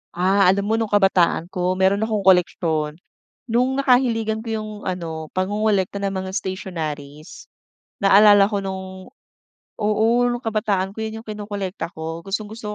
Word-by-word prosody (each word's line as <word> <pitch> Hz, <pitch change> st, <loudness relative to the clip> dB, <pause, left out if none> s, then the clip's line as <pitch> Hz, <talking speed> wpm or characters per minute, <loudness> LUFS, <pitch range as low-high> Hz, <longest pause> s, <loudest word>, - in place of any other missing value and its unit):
Ah, 190 Hz, +2 st, +3 dB
alam 195 Hz, +2 st, +3 dB
mo 220 Hz, +2 st, 0 dB
nung 225 Hz, -, 0 dB
kabataan 190 Hz, -3 st, +2 dB
ko 180 Hz, 0 st, -1 dB
meron 190 Hz, +2 st, +2 dB
akong 215 Hz, -3 st, -1 dB
koleksyon. 165 Hz, -4 st, +2 dB, 0.5 s
Nung 250 Hz, +3 st, +1 dB
nakahiligan 235 Hz, -5 st, +2 dB
ko 230 Hz, -, -11 dB
yung 215 Hz, 0 st, -6 dB, 0.2 s
ano, 165 Hz, -3 st, -4 dB
pangongolekta 200 Hz, 0 st, 0 dB
ng 195 Hz, -, 0 dB
mga 190 Hz, -, -6 dB
stationaries. 155 Hz, -6 st, -6 dB, 0.6 s
Naalala 200 Hz, 0 st, +7 dB
ko 205 Hz, -, -1 dB
nung 190 Hz, +1 st, -7 dB, 0.7 s
oo 215 Hz, +1 st, +2 dB, 0.2 s
nung 240 Hz, 0 st, -3 dB
kabataan 210 Hz, -4 st, 0 dB
ko -, -, -14 dB
'yon 220 Hz, 0 st, -5 dB
yung 225 Hz, -, -23 dB
kinokolekta 205 Hz, -4 st, -5 dB
ko 160 Hz, +1 st, -5 dB
gustong-gusto 210 Hz, +1 st, -5 dB
195 Hz, 140 wpm, -21 LUFS, 185-215 Hz, 0.7 s, Naalala